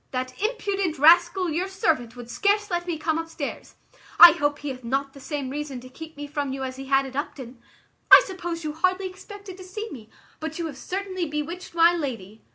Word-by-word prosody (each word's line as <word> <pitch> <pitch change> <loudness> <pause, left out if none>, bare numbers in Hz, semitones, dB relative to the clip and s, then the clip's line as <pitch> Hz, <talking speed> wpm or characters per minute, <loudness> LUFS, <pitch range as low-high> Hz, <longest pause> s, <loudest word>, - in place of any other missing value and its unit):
That 255 0 -3
impudent 400 -6 -1
rascal 345 +4 +5
your 350 +5 -1
servant 310 -11 -1
would 245 -1 -9
scarce 410 - 0
let 350 0 -2
me 340 -2 -2
come 320 +1 -1
upstairs. 325 -3 -6 0.4
I 345 0 +12
hope 290 -3 0
he 290 - -6
hath 255 -1 -7
not 270 +3 -2
the 275 - -12
same 275 -1 -4
reason 285 -2 -5
to 255 +1 -12
keep 320 +3 -11
me 290 - -5
from 285 -2 -3
you 265 0 -4
as 260 0 -5
he 270 - -7
had 270 0 +2
at 260 -1 -9
Upton. 260 -4 -6 0.5
I - - +10
suppose 345 -4 -5
you 305 -1 -3
hardly 370 +4 0
expected 390 0 -11
to 375 - -10
see 425 +4 -7
me; 225 -5 -10 0.3
but 315 0 -5
you 340 - -3
have 295 -4 -6
certainly 375 -2 -3
bewitched 310 +4 -5
my 335 +1 +6
lady. 230 - -5
315 Hz, 210 wpm, -25 LUFS, 270-365 Hz, 0.5 s, I